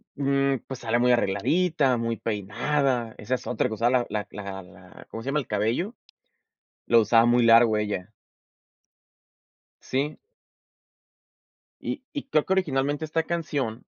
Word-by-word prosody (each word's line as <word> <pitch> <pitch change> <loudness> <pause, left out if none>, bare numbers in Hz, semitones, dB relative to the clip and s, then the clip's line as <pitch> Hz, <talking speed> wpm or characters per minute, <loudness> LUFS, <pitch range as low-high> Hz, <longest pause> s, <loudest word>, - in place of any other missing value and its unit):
mm, 140 -1 +1
pues, 135 -2 -6
sale 120 0 0
muy 125 0 +4
arregladita, 135 - +2
muy 115 0 -2
peinada, 115 +4 -1
esa 125 +5 -2
es - - -8
otra - - 0
cosa. 115 +2 +1
La 125 -1 +2
la 105 0 -3
la 100 -1 -6
la, 90 0 -16
¿cómo 115 0 -7
se 135 - -4
llama? 150 +2 +1
El 135 - -6
cabello, 115 - -1 0.9
lo 115 -1 +5
usaba 115 +2 +4
muy 120 0 +4
largo 115 -1 +6
ella. 105 -2 -3 1.7
Sí. 140 +3 -2 1.7
Y 275 - -4
y 285 - -4
creo 155 - +2
que 190 - +1
originalmente 145 -4 0
esta 160 +1 -1
canción 145 -9 -3
120 Hz, 140 wpm, -26 LUFS, 110-145 Hz, 1.7 s, largo